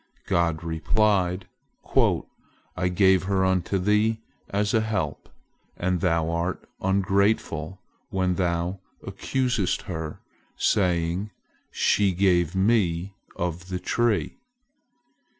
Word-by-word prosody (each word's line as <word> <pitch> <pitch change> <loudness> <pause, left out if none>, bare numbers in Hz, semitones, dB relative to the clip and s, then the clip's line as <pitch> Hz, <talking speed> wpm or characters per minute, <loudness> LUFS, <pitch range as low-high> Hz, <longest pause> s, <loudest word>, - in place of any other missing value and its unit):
God 85 -2 +1
replied: 90 +2 +1 1.3
"I 90 0 0
gave 95 0 +4
her 95 -1 +1
unto 95 +1 +1
thee 105 +4 +2 0.3
as 100 0 0
a 110 - +4
help, 100 -9 -3 0.5
and 90 -1 0
thou 85 -3 +1
art 85 +2 -2
ungrateful 95 -2 +1 0.3
when 95 -1 0
thou 90 +1 -1 0.3
accusest 125 -8 -1
her, 80 -5 -5 0.4
saying, 90 +1 +1 0.4
'She 100 -2 +2
gave 90 -2 +2
me 95 -3 +1 0.2
of 85 +1 -4
the 90 - -2
tree.' 120 - 0
95 Hz, 95 wpm, -25 LUFS, 85-100 Hz, 1.3 s, gave